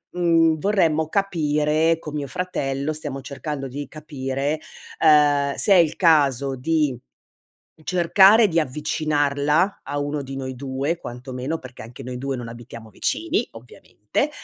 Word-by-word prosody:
mhmm, 165 -2 +3
vorremmo 160 -5 +1
capire 160 -4 +1
con 150 -2 -8
mio 145 -2 -3
fratello, 140 -3 -3
stiamo 145 -3 -5
cercando 140 +1 -5
di 140 +1 -6
capire, 145 -1 -3 0.4
ehm, 145 -2 +4
se 200 - +3
è - - +7
il 165 -3 +3
caso 140 -6 +3
di 150 0 0 0.9
cercare 190 +6 +5
di 165 0 +2
avvicinarla 150 +3 0
a 145 +1 -4
uno 145 0 -2
di 135 0 -7
noi 130 -1 -5
2 135 +5 -2
quanto 125 -2 -9
meno. 130 +6 -3
Perché 130 -4 -12
anche 120 +4 -11
noi 125 0 -6
2 135 0 -3
non 120 -2 -6
abitiamo 115 -1 -11
vicini, - - -1
ovviamente. 115 - -4
145 Hz, 140 wpm, -22 LUFS, 135-160 Hz, 0.9 s, è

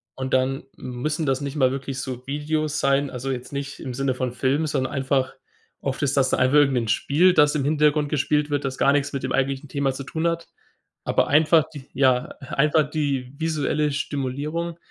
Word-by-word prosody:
und 130 0 -4
dann 130 +1 0
müssen 150 +6 -3
das 135 -1 0
nicht 140 0 -4
mal 130 -4 +3
wirklich 135 -1 -4
so 130 -1 -6
Videos 150 +1 -1
sein. 140 +1 +2
Also 130 +1 -4
jetzt 125 -1 -5
nicht 140 0 -5
im 125 - -6
Sinne 135 0 0
von 125 -1 -2
Filmen, 135 +5 0
sondern 130 -1 -1
einfach 135 -1 0 0.5
oft 135 +2 -3
ist 140 -1 +1
das 130 -1 +3
einfach 130 +3 +2
irgend 140 -3 +4
'n 115 -2 -1
Spiel, 155 +11 +3
das 150 -3 +4
im 145 - 0
Hintergrund 150 0 +2
gespielt 150 0 0
wird, 145 -1 0
das 130 -1 -3
gar 140 - +4
nichts 140 -1 0
mit 135 -1 -3
dem 130 - -2
eigentlichen 135 +1 -1
Thema 140 -1 0
zu 135 - -6
tun 160 +4 -2
hat. 170 0 -2 0.6
Aber - - +1
einfach 155 +1 +5
die 135 -2 -10
Ja, 130 -2 +3
einfach 150 +3 +1
die 140 -4 -2
visuelle 150 -2 0
Stimulierung 145 +4 -3
140 Hz, 195 wpm, -23 LUFS, 130-150 Hz, 0.6 s, einfach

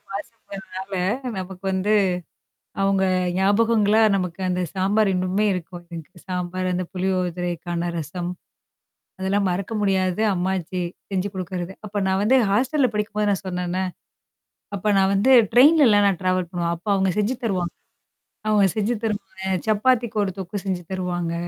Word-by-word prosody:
பாசங்கறனால 195 -2 -7 0.4
நமக்கு 185 0 -7
வந்து, 190 +3 +1 0.9
அவங்க 195 0 +2 0.3
ஞாபகங்களா 210 +2 +3
நமக்கு 180 -1 -2
அந்த 180 0 0
சாம்பார் 195 +2 +2
இன்னுமே 185 +3 0
இருக்கும். 175 -1 -6
எனக்கு. 165 0 -10
சாம்பார், 180 0 -2
அந்த 180 0 -1
புளியோதரைக்கான 175 -2 -2
ரசம். 175 +3 -4 0.9
அதெல்லாம் 195 +1 +1
மறக்க 190 +5 -3
முடியாது 190 -1 +1
அம்மாச்சி 185 0 -2 0.3
செஞ்சு 190 0 0
குடுக்கறது. 185 0 -4
அப்ப 205 0 -3
நான் 190 0 +1
வந்து 255 +5 +4
ஹாஸ்டல்ல 260 +7 +2
படிக்கும்போது 210 0 -1
நான் 195 - -2
சொன்னேன்னா. 180 0 -2 0.9
அப்ப 210 +2 0
நான் 195 0 +3
வந்து 225 +7 +3 0.2
ட்ரெயின்லலாம் 250 -5 +6
நான் 190 -4 0
ட்ராவல் 185 -1 0
பண்ணுவேன். 170 -1 -1
அப்ப 170 +5 -16
அவங்க 190 -1 +2
செஞ்சு 215 +5 +1
தருவாங் 185 -6 -1 0.8
அவங்க 210 -2 +4
செஞ்சு 215 +2 +1
தருவாங்க. 200 -3 -4 0.3
சப்பாத்திக்கு 230 +1 +2
ஒரு 190 - -1
தொக்கு 190 +2 -5
செஞ்சு 185 -2 -2
தருவாங்க. 175 -2 -2
190 Hz, 130 wpm, -23 LUFS, 180-210 Hz, 0.9 s, ட்ரெயின்லலாம்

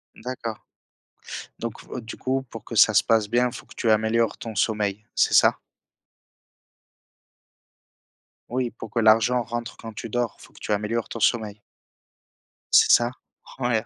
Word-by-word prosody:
D'accord, 115 -2 -6 1.0
donc 115 -1 -4 0.2
heu, 125 - -4
du 115 0 -9
coup 130 +1 -1
pour 115 - -10
que 115 - -8
ça 110 +1 +6
se - - +5
passe 110 -2 +2
bien, 125 +2 +2
faut - - -10
que - - -15
tu 115 - +1
améliores 110 +1 +2
ton 115 -2 -7
sommeil, 105 -1 0
c'est - - +2
ça? - - +5 2.9
Oui, 125 -1 -1
pour 115 - -9
que 120 - 0
l'argent 115 +2 +4
rentre 120 +2 -5
quand 115 -1 -9
tu 115 - -7
dors, 120 0 -2
faut - - -15
que - - -16
tu - - -5
améliores 105 +3 -1
ton 115 - -6
sommeil. 105 -2 +1 1.1
C'est - - +7
ça, 120 0 +4 0.5
ouais. 120 -3 0
115 Hz, 155 wpm, -24 LUFS, 110-120 Hz, 2.9 s, C'est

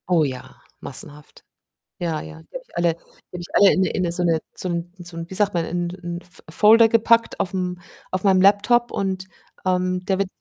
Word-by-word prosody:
Oh 170 -3 +4
ja, 130 -3 -6 0.2
massenhaft. 150 0 -10 0.6
Ja, 165 -3 -2
ja, 160 0 -10
die - - -30
habe - - -5
ich - - -23
alle 170 -1 +2
die 165 - -21 0.4
habe - - -6
ich 175 - -8
alle 200 -1 +7
in - - +1
'ne 185 - +2
in 185 - -1
'ne 170 - 0
so 180 +1 -1
'ne 165 -2 +2 0.2
so 185 - -4
'n 170 0 -4
so 175 -1 -10
'n 165 0 -5
wie - - -8
sagt 205 +1 +1
man, 170 -1 +1
in 175 +1 -2
'n 175 -1 -6
F 180 -1 -18
Folder 220 +7 +6
gepackt 230 +1 +3
aufm 180 -1 -2 0.3
auf 185 0 -2
meinem 190 -2 +4
Laptop 210 +5 +4
und, 190 -1 -2 0.4
ähm, 185 0 0
der 190 0 0
wird 195 -1 0
180 Hz, 225 wpm, -22 LUFS, 170-195 Hz, 0.6 s, alle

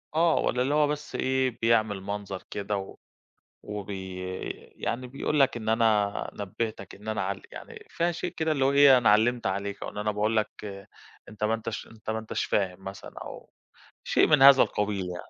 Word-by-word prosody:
آه، 165 0 +4
والَّا 125 - +1
اللي 140 +3 +1
هو 150 -1 +4
بس 150 0 -4
إيه 130 -2 0
بيعمل 110 -4 +2
منظر 100 -1 -5
كده 100 0 -2
و 95 0 -7 0.7
وبي 95 -3 -6 0.6
يعني 125 +2 -3
بيقول 140 +3 -1
لك 135 -3 +4
إن 110 -1 -5
أنا 110 -3 +2
نبِّهتك 110 +2 -5
إن 105 +2 -12
أنا 110 -3 -1
عل 95 +1 -3
يعني - - -10
في 170 +1 0
شيء 175 +1 -4
كده 160 -1 +1
اللي 135 -3 +1
هو 135 - +3
إيه 140 -2 +7
أنا 120 - +2
علّمت 115 +1 +3
عليك، 100 +1 -3
أو - - -4
إن - - -9
أنا 105 0 0
باقول 105 +2 0
لك 110 0 +1 0.8
أنت 105 0 -5
ما 110 - +2
أنتش 115 -1 -5
أنت 110 -1 -8
ما 110 - -1
أنتش 110 - -3
فاهم 95 -2 -1
مثلًا، 95 0 -8
أو - - -10 0.5
شيء - - +3
من 150 -3 +4
هذا 135 -1 +9
القبيل 100 -3 -2
يعني. 90 0 -8
110 Hz, 190 wpm, -27 LUFS, 100-130 Hz, 0.8 s, هذا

